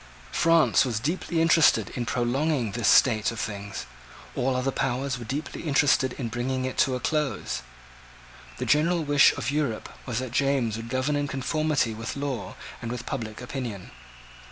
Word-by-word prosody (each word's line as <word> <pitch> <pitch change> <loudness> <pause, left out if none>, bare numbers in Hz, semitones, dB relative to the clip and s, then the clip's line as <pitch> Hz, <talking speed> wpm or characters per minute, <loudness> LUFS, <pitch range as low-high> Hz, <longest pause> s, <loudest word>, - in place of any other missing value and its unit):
France 165 -1 +4
was 120 -5 -1
deeply 165 +5 -2
interested 165 -1 +4
in 120 -3 -4
prolonging 125 0 0
this 115 +1 -1
state 110 -4 +5
of 115 - -7
things. 100 -1 -5 0.5
All 130 +1 0
other 130 +2 0
powers 130 0 -1
were 120 - -7
deeply 140 +7 -4
interested 140 -4 +2
in 125 - -4
bringing 130 +3 -2
it 130 - -3
to 130 - +3
a - - -3
close. 150 +1 -1 1.0
The - - -3
general 165 +3 +2
wish 145 -1 +5
of 130 -1 -3
Europe 140 -7 -2 0.2
was 120 -4 -2
that 130 -1 -3
James 135 -4 +1
would 115 +1 -7
govern 130 +4 0
in 145 0 0
conformity 140 -2 0
with 110 +1 -5
law 140 -6 -4 0.3
and 115 -1 -4
with 125 0 -5
public 115 -4 -5
opinion. 120 -6 -6
130 Hz, 165 wpm, -26 LUFS, 120-145 Hz, 1.0 s, state